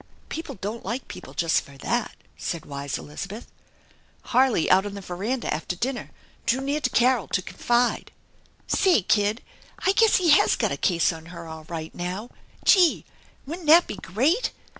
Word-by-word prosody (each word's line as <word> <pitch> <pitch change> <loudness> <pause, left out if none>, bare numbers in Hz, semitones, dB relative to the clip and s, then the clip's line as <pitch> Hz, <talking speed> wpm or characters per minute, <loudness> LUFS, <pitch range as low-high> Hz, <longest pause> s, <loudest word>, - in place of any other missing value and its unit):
"People 325 +1 -5
don't 210 +4 -5
like 230 +7 -4
people - - -10
just 165 -1 +2
for 140 -1 -15
that," 235 - -2 0.2
said 170 -3 -4
wise 140 -1 -4
Elizabeth. 195 +9 -7 0.8
Harley, 255 -7 +2
out 190 +1 +6
on 205 0 -6
the 200 - -6
veranda 200 +8 -3
after 165 +3 -3
dinner, 245 +6 -3 0.4
drew 250 - +3
near 280 +3 -1
to - - +1
Carol 245 -4 +3
to - - 0
confide. 240 +5 0 0.3
" - - -34
Say, 365 - +3
kid, 215 +2 +1 0.4
I 380 - +5
guess 440 +2 +4
he 360 -3 +3
has 315 +7 +5
got - - 0
a - - 0
case 170 -1 +2
on 160 0 -11
her 170 -1 -9
dll 160 -1 -10
right 160 -2 -5
now. 185 +6 -5 0.3
Gee! 360 -6 +5 0.4
Wouldn't 325 +3 -7
that 335 +3 +8
be 205 - -6
great 275 - +1
215 Hz, 175 wpm, -25 LUFS, 175-270 Hz, 0.8 s, that